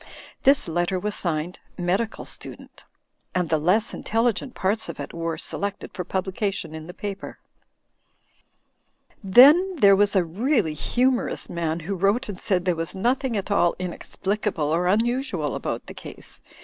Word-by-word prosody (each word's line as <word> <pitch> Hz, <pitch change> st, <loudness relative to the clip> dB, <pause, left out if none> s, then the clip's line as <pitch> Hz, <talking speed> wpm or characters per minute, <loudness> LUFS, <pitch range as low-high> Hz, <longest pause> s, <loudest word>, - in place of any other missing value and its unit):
This 275 Hz, -5 st, +5 dB
letter 175 Hz, +3 st, 0 dB
was 210 Hz, +3 st, -2 dB
signed 170 Hz, -1 st, -2 dB, 0.2 s
"Medical 190 Hz, +6 st, -1 dB
Student," -, -, -10 dB, 0.5 s
and 180 Hz, -3 st, 0 dB
the 160 Hz, -, +2 dB
less 195 Hz, +9 st, +2 dB
in -, -, -7 dB
telligent 235 Hz, +3 st, 0 dB
parts 205 Hz, +3 st, -1 dB
of -, -, -7 dB
it -, -, -6 dB
were 165 Hz, -1 st, -3 dB
selected 200 Hz, +4 st, -4 dB
for 180 Hz, -, -4 dB
publication 190 Hz, -1 st, -2 dB
in 160 Hz, 0 st, -8 dB
the 180 Hz, -, -8 dB
piper. 200 Hz, -1 st, -6 dB, 1.9 s
Then 295 Hz, -, +7 dB
there 200 Hz, -, +6 dB
was 205 Hz, +1 st, +3 dB
a 190 Hz, -, +4 dB
really 205 Hz, -, +1 dB
humorous 250 Hz, -, 0 dB
man, 165 Hz, -1 st, -2 dB
who 185 Hz, +5 st, -3 dB
wrote 200 Hz, +7 st, +1 dB
and 195 Hz, -2 st, -6 dB
said 180 Hz, -3 st, +1 dB
there 180 Hz, -2 st, +2 dB
was 165 Hz, +2 st, -3 dB
nothing 245 Hz, +3 st, 0 dB
at 200 Hz, +1 st, -4 dB
all 175 Hz, -4 st, +3 dB
inexplicable 185 Hz, -2 st, -2 dB
or 175 Hz, +2 st, +1 dB
un 210 Hz, +5 st, +3 dB
usual 240 Hz, -, -1 dB
about -, -, -4 dB
the -, -, -9 dB
case. -, -, -9 dB
195 Hz, 160 wpm, -24 LUFS, 175-225 Hz, 1.9 s, Then